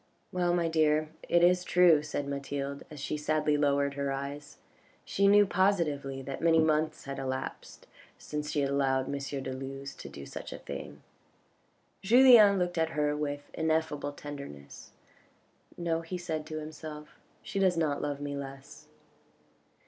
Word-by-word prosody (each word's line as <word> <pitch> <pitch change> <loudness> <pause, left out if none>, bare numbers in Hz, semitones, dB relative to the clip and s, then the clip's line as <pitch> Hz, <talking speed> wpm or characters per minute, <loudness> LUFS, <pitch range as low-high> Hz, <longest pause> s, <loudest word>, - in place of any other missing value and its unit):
"Well, 175 -1 +1
my 170 -1 +1
dear, 155 -1 +2 0.2
it 175 0 +4
is 180 +1 +4
true," 175 -4 +5
said 145 -1 -4
Mathilde, 140 0 -4
as 150 -2 -10
she 145 +2 -3
sadly 150 0 +1
lowered 140 -1 +2
her 140 0 -2
eyes. 140 +2 -6 0.5
She 200 0 +2
knew 205 +1 +7
positively 155 -9 0
that 135 +1 -6
many 165 0 +4
months 155 -1 +1
had 140 0 -6
elapsed 130 -1 -5 0.3
since 150 0 -5
she 150 - 0
had 140 0 0
allowed 135 -1 +1
M. - - -5
de 135 -1 -4
Luz 135 +1 -6
to - - -10
do 70 - -9
such - - -8
a - - -6
thing. - - -8 1.0
Julien 225 -2 +7
looked 175 -2 -1
at 160 0 +2
her 150 0 +1
with 145 -1 -4
ineffable 160 -2 -1
tenderness, 140 - -9 0.4
" - - -31
No," 165 -1 -1
he 165 +2 -5
said 160 -3 -4
to 155 -1 -5
himself, 155 0 -8
" - - -35
she 195 - -3
does 185 -3 +3
not 150 -3 0
love 145 -1 -3
me 145 0 -4
less." 135 -1 -9
150 Hz, 165 wpm, -30 LUFS, 140-165 Hz, 1.0 s, knew